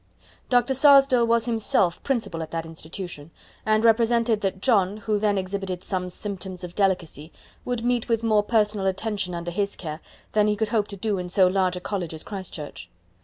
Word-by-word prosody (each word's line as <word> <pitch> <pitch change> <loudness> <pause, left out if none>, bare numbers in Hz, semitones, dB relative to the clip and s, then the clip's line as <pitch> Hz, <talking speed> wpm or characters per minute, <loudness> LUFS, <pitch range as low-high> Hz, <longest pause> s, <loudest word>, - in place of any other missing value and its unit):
Dr. 245 +1 +3
Sarsdell 270 -3 +6
was 230 -1 +3
himself 215 -7 +1
Principal 230 -11 -2
of 160 - -5
that 165 0 -3
institution, 165 -1 -8 0.4
and 215 0 +3
represented 230 -1 +3
that 190 -1 -1
John, 200 -4 +2
who 215 0 -1
then 205 -1 +1
exhibited 190 -1 -3
some 180 -2 -2
symptoms 190 -1 -6
of 175 -1 -7
delicacy, 175 -6 -1 0.3
would 245 -2 -2
meet 245 -1 0
with 230 -1 +1
more 215 -2 +4
personal 210 -2 +1
attention 195 -1 -2
under 170 0 -4
his 200 +3 -1
care 155 -3 -6 0.3
than 210 -1 +3
he 210 - +2
could 215 0 -1
hope 215 -2 +1
to 200 - -8
do 205 -1 -1
in 180 0 -5
so 185 +1 +4
large 185 0 +2
a - - -4
college 180 -4 -4
as 155 - -6
Christ 195 -3 -6
Church. 150 -3 -8
200 Hz, 190 wpm, -25 LUFS, 180-225 Hz, 0.4 s, Sarsdell